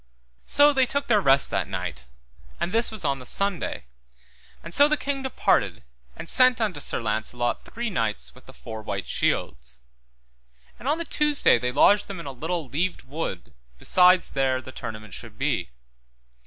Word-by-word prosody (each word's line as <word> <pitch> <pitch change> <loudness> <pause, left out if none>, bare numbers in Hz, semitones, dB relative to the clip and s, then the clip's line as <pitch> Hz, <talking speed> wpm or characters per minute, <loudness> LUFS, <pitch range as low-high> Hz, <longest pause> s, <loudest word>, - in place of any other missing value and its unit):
So 290 +1 +6
they 265 -2 +3
took 280 +2 -1
their 215 -5 +3
rest 135 -5 +4
that - - -1
night, - - -5 0.5
and 175 - -2
this 230 +2 +2
was 215 -2 -4
on 140 -1 0
the - - -9 0.2
Sunday, 195 - -2 0.8
and 165 - -8
so 285 +7 +6
the 305 +1 +1
king 275 -1 -3
departed, 265 - 0 0.3
and - - -8
sent 255 +2 +4
unto 205 -9 -1
Sir - - -2
Launcelot 115 +2 -2
three 235 -1 -4
knights 105 - -2
with - - -19
the - - -11
four 110 - -8
white - - -4
shields. 60 0 -2 1.0
And 255 - -8
on 300 +3 +2
the 335 - -4
Tuesday 300 - +3
they 125 +1 -1
lodged 205 +10 +4
them 195 -3 -7
in 170 - -8
a 140 - -5
little 160 +4 -4
leaved 170 +8 -2
wood 130 - -6 0.2
beside 180 - +5
there 135 -2 -1
the 130 - -10
tournament 110 -5 -8
should - - -9
be. - - -1
165 Hz, 175 wpm, -25 LUFS, -, 1.0 s, So